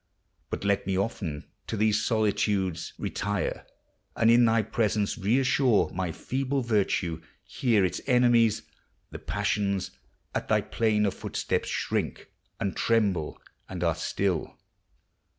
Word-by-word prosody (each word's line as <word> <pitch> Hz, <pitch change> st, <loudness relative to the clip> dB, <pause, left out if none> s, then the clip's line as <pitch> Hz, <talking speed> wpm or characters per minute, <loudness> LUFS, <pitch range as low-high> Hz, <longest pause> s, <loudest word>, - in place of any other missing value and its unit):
But -, -, -4 dB
let 100 Hz, -2 st, +1 dB
me 95 Hz, -1 st, 0 dB
often 95 Hz, -7 st, -3 dB, 0.2 s
to 110 Hz, -, -3 dB
these 105 Hz, 0 st, +2 dB
solitudes 105 Hz, -5 st, 0 dB
Retire, 100 Hz, -1 st, -3 dB, 0.5 s
and 115 Hz, 0 st, +4 dB
in 120 Hz, +1 st, +6 dB
thy 115 Hz, -1 st, +3 dB
presence 105 Hz, -1 st, 0 dB
reassure 125 Hz, +2 st, +2 dB
My 90 Hz, -1 st, -2 dB
feeble 135 Hz, -, -2 dB
virtue. 95 Hz, -7 st, 0 dB, 0.2 s
Here 110 Hz, -6 st, +1 dB
its 90 Hz, -, -2 dB
enemies, 120 Hz, -4 st, +4 dB, 0.5 s
The -, -, -7 dB
passions, 100 Hz, -2 st, -1 dB, 0.4 s
at -, -, -2 dB
thy -, -, +3 dB
plainer 105 Hz, -3 st, +1 dB
footsteps -, -, -2 dB
shrink -, -, -2 dB, 0.3 s
And 100 Hz, -, -2 dB
tremble, 100 Hz, -9 st, +1 dB, 0.3 s
and 90 Hz, -2 st, -4 dB
are 85 Hz, -1 st, +3 dB
still. 85 Hz, +1 st, -2 dB
105 Hz, 120 wpm, -27 LUFS, 95-115 Hz, 0.5 s, in